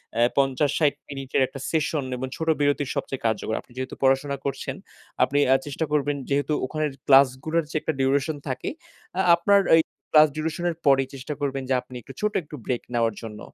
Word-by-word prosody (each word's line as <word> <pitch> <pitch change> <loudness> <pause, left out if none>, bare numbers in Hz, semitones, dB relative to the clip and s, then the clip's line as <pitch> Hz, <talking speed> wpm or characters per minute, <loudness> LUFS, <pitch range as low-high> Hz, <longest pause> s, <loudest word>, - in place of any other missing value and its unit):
অ্যা 120 +1 +4
৫০,৬০ 140 +2 +2 0.2
মিনিটের 135 -1 -2
একটা 135 - -9
সেশন 155 -2 0
এবং 130 +1 -4
ছোট 160 - -4
বিরতির 145 -1 +1
সবচেয়ে 135 - -4
কার্যকর। 110 0 0
আপনি - - -26
যেহেতু 130 0 -4
পড়াশোনা 135 +1 +2
করছেন, 140 - -3 0.5
আপনি 140 +2 +1
আ - - +6
চেষ্টা 145 +3 -2
করবেন 145 -1 +1
যেহেতু 140 +1 +1
ওখানের 155 +2 -2 0.2
ক্লাসগুলোর 140 +4 +4
যে - - -10
একটা 160 - -1
ডিউরেশন 140 +3 +1
থাকে, 130 - -3 0.5
আ - - +5
আপনার 200 +4 +4
ওই 160 - +8 0.3
ক্লাস 155 -1 +8
ডিউরেশন 160 +2 -3
এর 170 - -3
পরেই 135 -1 +4
চেষ্টা 135 +2 -5
করবেন 135 -1 -2
যে 130 - +3
আপনি 125 - -13
একটু 135 - -12
ছোট 210 0 0
একটু 150 - -10
ব্রেক 125 -2 -2
নেওয়ার 115 -2 +1
জন্য। 110 -2 -8
140 Hz, 185 wpm, -25 LUFS, 130-155 Hz, 0.5 s, ওই